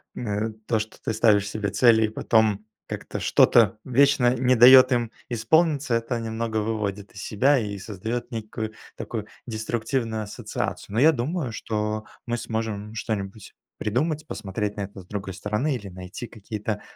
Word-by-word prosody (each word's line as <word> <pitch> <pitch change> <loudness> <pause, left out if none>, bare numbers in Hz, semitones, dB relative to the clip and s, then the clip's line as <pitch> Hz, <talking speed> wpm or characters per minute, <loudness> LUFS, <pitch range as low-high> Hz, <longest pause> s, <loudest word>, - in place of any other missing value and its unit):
м, 110 -1 -2
то, 115 - +2
что 110 +1 -6
ты 115 - -2
ставишь 105 -2 +3
себе 105 -1 -2
цели, 110 +2 +5
и - - -2
потом 110 -1 +2 0.2
как-то - - -5
что-то 115 -2 +5
вечно 130 -1 +4
не 130 +1 +3
даёт 130 +2 +9
им 120 -2 +1 0.2
исполниться- 145 +4 +2
это 115 +1 -1
немного 115 0 -3
выводит 105 -2 -2
из 100 - -8
себя, 135 +7 +3
и 105 -4 -3
создаёт 110 +5 -5
некую 110 -1 -5 0.2
такую - - -5 0.2
деструктивную 110 0 -2
ассоциацию. 105 -1 -5
Но 115 - +2
я 155 +4 +7
думаю, 135 +2 -2
что 105 -1 -2 0.2
мы 120 -1 -1
сможем 110 -2 -4
что-нибудь 105 -2 -5 0.2
придумать, 155 +8 -1
посмотреть 105 0 -4
на 105 - -4
это 100 0 -7
с - - -17
другой 100 -1 -5
стороны 105 +10 -1
или 105 -5 -7
найти 95 +5 -8
какие-то, 105 -1 -5
110 Hz, 155 wpm, -25 LUFS, 105-120 Hz, 0.2 s, даёт